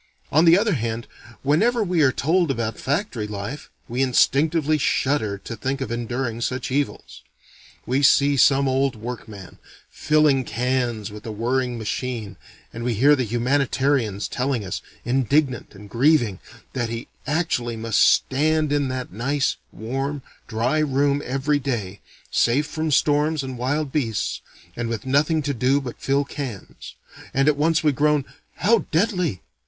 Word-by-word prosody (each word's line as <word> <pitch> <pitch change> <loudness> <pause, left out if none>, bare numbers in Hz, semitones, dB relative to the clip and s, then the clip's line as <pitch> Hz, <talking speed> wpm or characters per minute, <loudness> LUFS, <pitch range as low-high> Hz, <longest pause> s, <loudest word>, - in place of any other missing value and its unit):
On 155 +4 +5
the 170 +1 +7
other 210 0 +2
hand 115 -2 -3 0.4
whenever 220 - +2
we 180 -4 +1
are 135 -3 +5
told 165 +5 +1
about 115 -4 -2
factory 135 - -2
life, 105 +7 -6 0.2
we 125 +3 -2
instinctively 150 +4 +2
shudder 130 -8 0
to 115 - -6
think 135 +5 -3
of 135 -5 -4
enduring 120 0 -3
such 130 +2 -2
evils. 145 +1 -3 0.6
We 130 +3 +1
see 140 +1 +5
some 140 +1 +4
old 135 0 +1
work 115 +2 -7
man, 100 -4 -11 0.3
filling 150 -3 +3
cans 120 -2 -1
with 105 0 -10
a - - -3
whirring 120 +3 -1
machine; 115 -1 -4 0.4
and 115 - -6
we 120 -1 0
hear 140 +7 +5
the 130 - -1
humanitarians 125 -2 0
telling 125 -4 -2
us, 95 - -4 0.2
indignant 130 -1 0
and 105 +1 -12
grieving, 120 - +2 0.3
that 120 -3 -2
he 115 0 -5 0.2
actually 145 -8 -1
must 110 -1 +1
stand 155 +2 +3
in 145 -1 +1
that 130 -5 -5
nice, 135 +6 0
warm, 135 +5 -4 0.2
dry 125 +6 0
room 140 -1 +1
every 140 +3 0
day, 110 -8 -3 0.3
safe 135 +6 +2
from 160 0 -3
storms 150 +1 +2
and 130 -1 -5
wild 135 +4 -1
beasts, 115 -8 -1 0.3
and 120 -1 -3
with 115 +1 -4
nothing 150 +4 +2
to 140 0 -1
do 130 +3 +2
but 130 -4 -8
fill 140 +1 +1
cans; 130 -9 -7 0.4
and 135 +2 +3
at 150 - +4
once 160 +2 +2
we 150 - +4
groan: 150 0 +2 0.3
"How 225 +4 +3
deadly! 180 - 0
135 Hz, 155 wpm, -23 LUFS, 120-145 Hz, 0.6 s, the